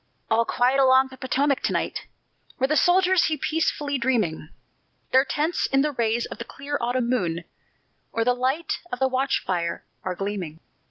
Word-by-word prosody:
All 230 +1 +3
quiet 255 +4 +2
along 265 0 +5
the 260 - -11
Potomac 275 +1 +1
to - - 0
night, - - -2 0.5
Where 265 - +2
the 305 - +1
soldiers 365 +1 +4
lie 310 - -1
peacefully 295 -3 -1
dreaming; 215 -12 0 0.6
Their 260 +1 +6
tents 310 +5 0
in 270 0 +2
the 300 - 0
rays 235 -2 0
of - - -9
the - - -3
clear 280 +4 -6
autumn 245 0 0
moon, 175 -9 -1 0.7
Or 230 - 0
the 250 +2 +3
light 260 +6 -1
of - - -2
the 265 +1 +2
watch 265 +1 0
fire, 170 -2 -2 0.2
are 185 -1 -3
gleaming. 185 -5 -4
260 Hz, 175 wpm, -24 LUFS, 225-280 Hz, 0.7 s, Their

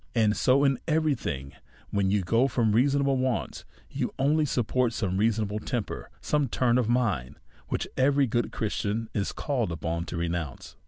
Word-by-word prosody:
And 110 -2 +3
so 135 +2 +3
in 135 -3 +2
every 155 -1 +2
thing, 70 - -5 0.4
when 100 -1 +1
you 100 0 +1
go 115 +8 +3
from 115 -5 +1
reasonable 140 +4 +3
\vants^ 130 -2 -2 0.2
you - - -3
only 150 +3 +2
support 125 -2 0
some 100 -5 -1
unreason 110 +3 +2
able 105 +1 -3
temper, 120 -1 -4
some 150 -2 +1
turn 125 +1 +2
of 120 -3 0
mind 100 - 0 0.3
which - - -2
every 140 +1 +4
good 120 0 -1
Christian 110 +1 -2
is 100 -1 -1
called 125 - -1
upon 85 +1 -3
to 90 - -5
renounce. 85 -4 -4
115 Hz, 170 wpm, -27 LUFS, 100-130 Hz, 0.4 s, every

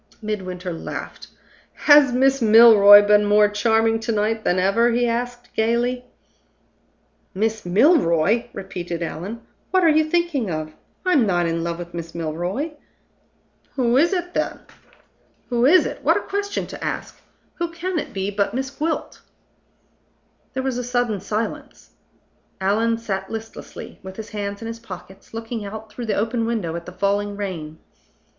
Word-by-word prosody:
Midwinter 185 -4 -4
laughed. 165 - -7 0.5
"Has 290 -3 +6
Miss 265 +2 +2
Milroy 215 -2 +8
been 210 0 +5
more 210 0 +5
charming 225 +2 +2
to 225 - -3
night 215 +1 0
than 180 - +1
ever?" 200 +6 +3
he 240 +1 +1
asked, 245 +1 -4
gayly. 240 +3 0 1.3
"Miss 215 -1 -1
Milroy!" 210 - +3
repeated 175 -3 -5
Allan. 190 +8 -6 0.3
"What 375 -1 +2
are 330 - +6
you 310 0 +4
thinking 310 - 0
of! 155 -1 -4 0.3
I'm 295 -11 +3
not 175 -2 +1
in 165 0 -1
love 170 0 -3
with 175 0 -8
Miss 170 -1 -7
Milroy." 175 - -3 1.0
"Who 245 -3 +1
is 320 +7 +4
it, 355 -2 -2
then?" - - -2 0.9
"Who 240 0 +2
is 365 +5 +6
it! - - -5
What - - +4
a - - -2
question 405 0 -3
to - - -9
ask! - - -5 0.4
Who 340 0 -1
can 340 +1 -3
it - - -6
be 195 +1 -3
but 200 +3 -1
Miss 265 +1 -3
Gwilt?" 315 +3 -3 1.3
There 260 - -2
was 260 -2 -2
a - - -3
sudden 245 -4 -1
silence. 215 +3 -5 0.7
Allan 220 +4 +1
sat 195 -4 -4
listlessly, 225 0 -8
with 190 0 -9
his 220 -1 -7
hands 205 0 -5
in - - -5
his 230 0 -6
pockets, 190 -3 -11
looking 225 0 -5
out 215 +2 -8
through 235 +2 -6
the 215 - 0
open 225 +2 -1
window 205 -9 -2
at 170 0 -7
the - - -7
falling 200 +2 -1
rain. 165 -6 -5
220 Hz, 155 wpm, -22 LUFS, 195-245 Hz, 1.3 s, Milroy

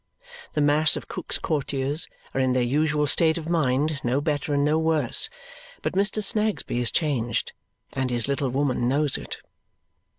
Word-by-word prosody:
The 150 - 0
mass 150 +2 +4
of - - -6
Cook's - - -3
Courtiers 145 0 0 0.3
are 135 - 0
in 130 -1 +2
their 125 -1 +2
usual 150 +4 +1
state 160 +3 +2
of 160 -1 -6
mind, 150 -2 +1
no 125 +3 +1
better 145 -1 -2
and 145 0 +2
no 155 +2 +2
worse; 160 -6 +2 0.5
but - - -1
Mr. 200 +2 +1
Snagsby 210 - 0
is 120 - +1
changed, 125 -8 -1 0.4
and 130 -1 -1
his 120 -1 0
little 140 -1 0
woman 130 -2 0
knows 145 +2 +1
it. - - -5
145 Hz, 165 wpm, -25 LUFS, 130-155 Hz, 0.5 s, mass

